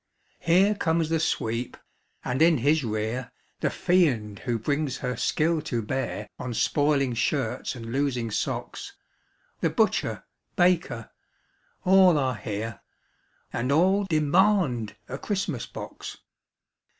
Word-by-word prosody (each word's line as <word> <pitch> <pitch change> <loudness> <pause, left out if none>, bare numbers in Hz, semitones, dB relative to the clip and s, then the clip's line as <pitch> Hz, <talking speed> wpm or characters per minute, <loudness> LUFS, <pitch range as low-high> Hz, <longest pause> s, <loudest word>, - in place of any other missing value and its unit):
Here 185 +5 +4
comes 165 -5 0
the 165 0 +1
sweep, 115 -6 -1 0.5
and 125 +3 -1
in 165 -1 +6
his 145 +4 +2
rear 110 +2 -3 0.3
The - - +1
fiend 125 - +1
who 120 -2 -1
brings 145 +3 -1
her 125 -1 -3
skill 160 +1 +1
to 115 -3 -1
bear 120 -2 -3
On 125 -2 -4
spoiling 145 0 +2
shirts 120 +1 -1
and 115 -2 -7
losing 125 -4 -1
socks; - - -3 0.7
The - - +1
butcher, - - 0 0.3
baker 165 -10 +1 0.7
ŌĆö 185 - +3
^all 185 -4 +7
are 130 -3 0
here, 110 -1 -5 0.7
And 125 +3 -1
all 190 +7 +3
demand 155 - +2
a 135 - -6
Christmas 190 - -2
box. - - -8
140 Hz, 125 wpm, -26 LUFS, 120-165 Hz, 0.7 s, ^all